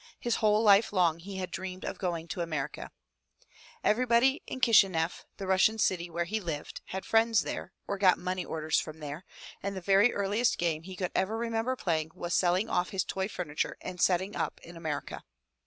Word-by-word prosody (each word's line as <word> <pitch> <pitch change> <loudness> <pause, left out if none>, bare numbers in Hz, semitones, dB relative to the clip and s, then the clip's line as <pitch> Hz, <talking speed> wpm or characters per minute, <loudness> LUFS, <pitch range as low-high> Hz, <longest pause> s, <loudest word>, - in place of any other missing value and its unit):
His 240 -1 0
whole 215 0 +3
life 205 +1 +6
long 175 -4 +2
he 190 +3 -8
had 185 -1 -4
dreamed 185 0 -5
of - - -5
going 170 -3 -2
to 175 - -3
America. 150 -4 -4 0.9
Everybody 245 +5 +3
in 260 - -5
Kishineff, 190 -9 +3
the 195 - -5
Russian 190 +4 +3
city 175 -5 +1
where 170 +1 -1
he 215 +5 -2
lived, 160 -6 -5
had 190 0 -5
friends 225 -1 +4
there, - - -5 0.2
or 200 - -3
got 185 -2 +5
money 185 0 -3
orders 160 -1 0
from 155 0 -7
there, 150 +3 -7 0.4
and 200 0 -3
the - - -2
very 195 +5 +4
earliest 205 +4 +1
game 165 -3 0
he 185 +2 -9
could 180 -1 -3
ever 210 +4 0
remember 230 +2 -1
playing 160 -8 -1
was 175 -1 -4
selling 185 +4 +2
off 180 -4 0
his 190 -2 -1
toy 190 0 -2
furniture 170 -7 -3
and 180 -1 -6
setting 190 +2 +2
up - - -2
in 170 - -11
America. 160 -3 -4
185 Hz, 190 wpm, -30 LUFS, 170-210 Hz, 0.9 s, life